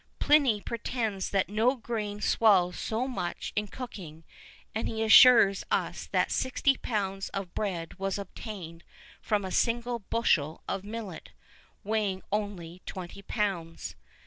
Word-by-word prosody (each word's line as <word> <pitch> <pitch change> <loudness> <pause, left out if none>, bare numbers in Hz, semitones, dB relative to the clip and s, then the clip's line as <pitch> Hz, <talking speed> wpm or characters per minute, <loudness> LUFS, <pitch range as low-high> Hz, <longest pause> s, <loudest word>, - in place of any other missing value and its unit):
[V - - -2
21] 300 0 +6
Pliny 220 -6 +1
pretends 225 -4 -3
that 195 -1 +1
no 225 +6 +2
grain 215 -4 -4
swells 195 -5 +4
so 230 +4 -1
much 180 -9 -4
in 210 0 0
cooking, 185 -10 -8 0.5
and 220 - -1
he 220 0 -2
assures 220 -3 +8
us - - -1
that - - +1
sixty 260 +1 +2
pounds 195 -5 -3
of 195 -3 -4
bread 180 -4 -3
was 195 0 -1
obtained 185 -4 -8 0.4
from 205 -2 0
a 185 - -5
single 240 +2 0
bushel 170 -8 0
of 195 - -3
millet, 210 -4 -7 0.5
weighing 205 -3 -1
only 185 -4 -3
twenty 185 +1 -7
pounds. 190 -6 -3
205 Hz, 140 wpm, -29 LUFS, 185-230 Hz, 0.5 s, assures